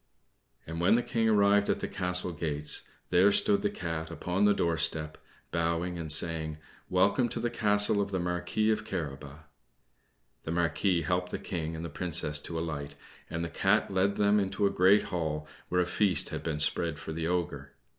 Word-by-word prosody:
And 80 +1 -5
when 90 +5 +5
the 120 - +1
King 115 -1 0
arrived 100 -1 +4
at - - +1
the - - -3
castle 90 0 0
gates, 75 -2 -1 0.2
there 90 +3 +5
stood 100 0 +3
the 105 - +1
Cat 80 -3 -4
upon 90 +3 -1
the 105 - +5
doorstep, 80 -3 +1 0.4
bowing 85 +1 -1
and 80 -2 -4
saying 80 -1 +2 0.3
"Welcome 100 +7 +2
to - - -3
the 120 - -1
castle 105 -2 +2
of 100 - -2
the 95 -2 -2
Marquis 90 +5 0
of 110 - -1
Carabas!" 75 -1 -6 1.0
The 80 - -5
Marquis 85 +1 +1
helped 90 +3 -1
the - - -3
King 80 -3 -4
and 80 +1 -5
the - - -3
Princess 75 -2 -2
to 85 +2 -5
alight, 70 -3 -4 0.3
and 85 +1 -3
the - - -5
Cat - - +1
led 95 +1 +2
them 105 0 +3
into 95 +1 0
a 100 - +2
great 95 +2 +5
hall, 75 -3 -3 0.2
where 90 0 +2
a - - +1
feast 95 +1 +1
had - - -4
been 80 -2 -3
spread 80 +1 +1
for 80 - -7
the 80 0 -2
Ogre. 90 -1 -3
90 Hz, 185 wpm, -29 LUFS, 80-100 Hz, 1.0 s, when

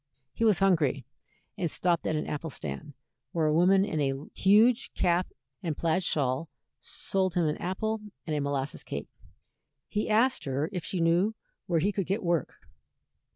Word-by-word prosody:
He - - -2
was 215 -4 +5
hungry, 155 - +2 0.5
and 170 - 0
stopped 175 +2 +1
at 160 - 0
an 155 - -1
apple 150 +2 -4
stand, 70 - -6 0.4
where 165 -2 +1
a 155 - +3
woman 190 +4 +5
in 160 -7 -2
a 135 -1 +1 0.2
huge 220 +6 +4
cap 175 +1 +2 0.3
and 160 -4 -3
plaid 165 +2 +1
shawl 140 0 0 0.3
sold 190 -2 -1
him 175 -2 +2
an 150 - 0
apple 215 +5 -2 0.2
and 155 - -2
a 150 - 0
molasses 140 -1 -2
cake. 70 +1 -5 0.8
He 210 +1 -2
asked 235 +4 +3
her 140 +3 -1
if 180 -3 -3
she 180 0 -2
knew 175 +6 +3 0.3
where 170 -4 +2
he 200 - +2
could 195 -3 -2
get 195 +4 -1
work. 170 - -1
170 Hz, 170 wpm, -29 LUFS, 150-195 Hz, 0.8 s, was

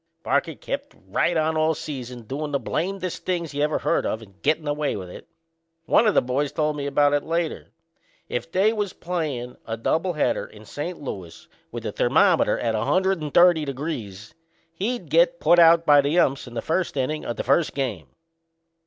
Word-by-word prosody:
Parker 145 +3 0
kept 280 +2 -5
right 170 -1 +1
on 160 0 +1
all 155 0 +2
season 125 -5 -7
doin' 145 +6 -4
the 140 - 0
blamnedest 185 +2 -3
things 170 -4 -2
you 145 - -2
ever 150 +1 +1
heard - - 0
of 110 +1 -3
and 100 -2 -19
gettin' 155 +2 +1
by 145 -1 -1
with 90 -3 -7
'em. - - -9 0.6
One 225 - +4
o' - - +5
the - - +3
boys 135 +3 -1
told 150 -1 0
me 140 -1 -3
about 145 +1 +3
it 145 - +2
later. 165 0 -2 0.6
If 145 +7 -4
they 200 +4 +3
was 205 -3 -2
playin' 150 -9 -4
a 115 0 -3
double 165 +10 0
header 150 - 0
in 105 0 -15
St. 160 - -5
Louis, 95 - -8 0.2
with - - -6
the - - -3
thermometer - - +3
at 115 -1 -1
130 175 - +3
degrees, 125 - -5 0.4
he'd 225 +8 -3
get - - +4
put 175 - +5
out 165 0 +6
by 145 -2 +7
the 145 +5 0
umps 135 -6 +2
in 120 - -10
the 115 - -3
first 170 +1 -1
innin' 145 +4 -1
o' - - -3
the - - -4
first 145 +5 +2
game. 120 - -3
150 Hz, 190 wpm, -24 LUFS, 130-170 Hz, 0.6 s, by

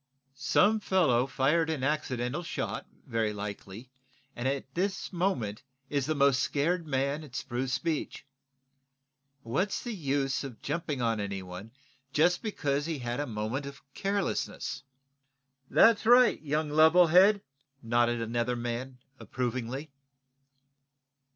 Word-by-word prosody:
"Some 205 +10 +3
fellow 155 - +2
fired 150 +5 +1
an 155 -5 -2
accidental 135 -1 -1
shot, 170 - -4 0.2
very 115 -3 0
likely, 105 +3 -7 0.4
and 120 +2 -2
is 135 - +2
at 135 -1 -10
this 190 +2 -2
moment 150 - -1 0.3
the 145 +2 0
most 140 -2 +4
scared 165 +5 0
man 140 +2 -1
at 135 -5 -12
Spruce 130 0 -2
Beach. 160 -5 -3 1.2
What's 180 - -1
the 240 - -4
use 140 -6 -1
of 130 -5 -8
jumping 150 -3 -3
on 115 -2 +1
anyone 95 0 -5 0.4
just 175 +4 +3
because 145 -9 -1
he 165 -2 -2
had 120 0 -3
a 145 - -2
moment 115 +5 -3
of 140 0 -10
carelessness?" 195 -7 -2 0.9
"That's 225 -1 +5
right, 245 +1 +6
young 150 0 -1
level 160 +4 +6
head!" 195 +5 +5 0.4
nodded 120 0 +2
another 120 +2 -1
man, 120 +2 -4 0.2
approvingly. 130 +3 -4
140 Hz, 125 wpm, -29 LUFS, 120-165 Hz, 1.2 s, right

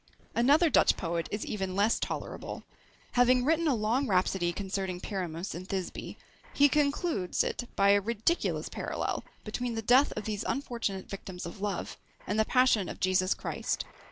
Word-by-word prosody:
Another 295 +7 +4
Dutch - - +5
poet 170 -1 -2
is 210 - -3
even 190 -3 -3
less 205 +3 +3
tolerable. - - -5 0.5
Having 245 0 +4
written 325 +2 +2
a 280 - +3
long 230 +5 +1
rhapsody 185 -2 +1
concerning 190 -1 -3
Pyramus 180 -3 -4
and 180 +3 -8
Thisbe, 190 -2 -4 0.4
he 285 0 +6
concludes 290 - +1
it 245 - -3
by 200 0 +4
a 200 0 +5
ridiculous 230 - 0
parallel - - -3 0.2
between 235 +2 -3
the 225 - -2
death 255 +6 +5
of 215 - -5
these 215 0 -2
unfortunate 235 -7 -3
victims 185 -2 -7
of 175 +4 -8
love, 205 -3 -3 0.3
and 210 +2 -1
the 220 - +4
passion 250 -7 +3
of - - -7
Jesus 185 0 +2
Christ. - - -3
210 Hz, 160 wpm, -30 LUFS, 190-250 Hz, 0.5 s, he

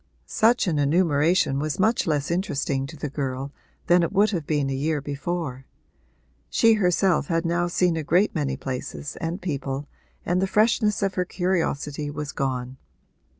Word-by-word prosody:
Such 235 +3 +3
an 160 -5 0
enumeration 150 -1 +2
was 155 +2 -2
much 220 +2 +2
less 150 0 0
interesting 140 -6 -1
to 155 +2 -10
the 150 - -3
girl 135 -1 -4 0.3
than 175 0 +5
it 170 - 0
would 205 +2 +3
have 170 -7 -3
been 145 -3 +1
a 135 - -2
year 150 +3 0
before: 140 -1 -4 0.8
she 230 -1 +4
herself 180 -5 +2
had 165 0 0
now 175 +1 +1
seen 175 0 +1
a 160 - -1
great 180 +8 +2
many 140 -5 -1
places 130 +2 -5
and 165 +3 -3
people 140 -5 -4 0.4
and 180 +2 +1
the 190 - +1
freshness 210 0 +2
of 195 -1 0
her 180 - 0
curiosity 160 -6 -1
was 150 0 -5
gone. 130 -2 -3
160 Hz, 165 wpm, -24 LUFS, 140-180 Hz, 0.8 s, than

